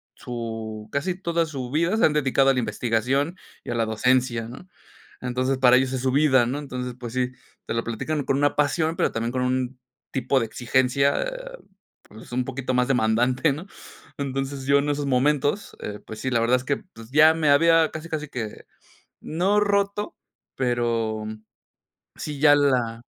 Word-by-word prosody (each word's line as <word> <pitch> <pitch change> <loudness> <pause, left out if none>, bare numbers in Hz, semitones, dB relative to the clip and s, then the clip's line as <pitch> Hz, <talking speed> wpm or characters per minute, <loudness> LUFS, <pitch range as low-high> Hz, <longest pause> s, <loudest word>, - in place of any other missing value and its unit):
su 110 -3 -6
casi 175 +6 -1
toda 170 -1 +1
su 135 -5 -6
vida 170 +6 +1
se - - +4
han 155 - +3
dedicado 135 -2 +3
a - - +5
la 125 - 0
investigación 125 - 0 0.3
y - - -9
a - - -2
la 115 -1 +1
docencia, 120 +1 +1
¿no?, 130 +10 -11 0.5
entonces, 130 +2 -1
para 125 -1 +6
ellos 130 0 +1
es 130 - -2
su 130 0 +1
vida, 130 -3 +4
¿no?, 130 +5 -2
entonces, 125 -3 -5
pues 120 -2 -7
sí, 125 0 0 0.3
te - - -3
lo 115 0 -1
platican 145 +6 -3
con 135 - +1
una 145 0 +2
pasión, 155 +3 +1
pero - - +1
también 115 +1 -2
con 130 - -1
un 130 0 -1 0.3
tipo 135 0 +1
de 115 - 0
exigencia, 130 +4 +1
eh, - - -7 0.5
pues 110 +3 -14
un 125 0 0
poquito 130 0 -3
más 125 0 +2
demandante, 125 +3 +2
¿no?, 155 +7 -7 0.5
entonces, 135 0 -3
yo 140 +1 +4
en 145 +1 -1
esos 145 0 -1
momentos, 145 +7 +1
eh, 105 0 -6
pues 110 -1 -8
sí, 130 - -2
la 120 - +2
verdad 120 +2 +3
es 125 - -6
que, 140 - 0
pues 115 - -15
ya 155 +2 +7
me 155 -3 +1
había 165 +2 +5
casi, 155 +1 -7
casi 150 -2 -4
que, 115 -6 -6 0.6
no 190 +6 +1
roto, 200 0 0 0.4
pero 115 -3 -1 0.9
sí 150 -2 -5
ya 145 -1 +7
la, 125 -5 +1
130 Hz, 185 wpm, -24 LUFS, 120-150 Hz, 0.9 s, ya